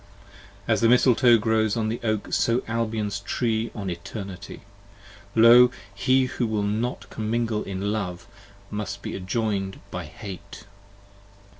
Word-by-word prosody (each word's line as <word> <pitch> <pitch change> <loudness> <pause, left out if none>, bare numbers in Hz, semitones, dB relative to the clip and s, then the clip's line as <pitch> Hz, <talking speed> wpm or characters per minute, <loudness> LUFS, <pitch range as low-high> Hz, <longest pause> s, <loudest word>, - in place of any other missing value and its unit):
55 - - -13
As - - +3
the 115 - +5
Misletoe 125 -1 +5
grows 110 0 +1
on 110 -1 0
the 115 +2 -2
Oak, 110 -2 -1
so 115 +2 +2
Albion's 110 -3 -2
Tree 110 +2 -1
on 100 -3 -5
Eternity: 95 +1 -7 0.7
Lo! 120 +2 +8 0.2
He 130 +7 +3
who 125 -2 -2
will 110 -2 -1
not 110 +5 -2
comingle 110 0 -1
in 100 +1 -3
Love, 90 -5 -4 0.5
must 105 -2 -5
be - - -4
adjoin'd 95 0 -2
by 90 -1 -5
Hate. 95 +4 -9
110 Hz, 135 wpm, -25 LUFS, 100-115 Hz, 0.7 s, Lo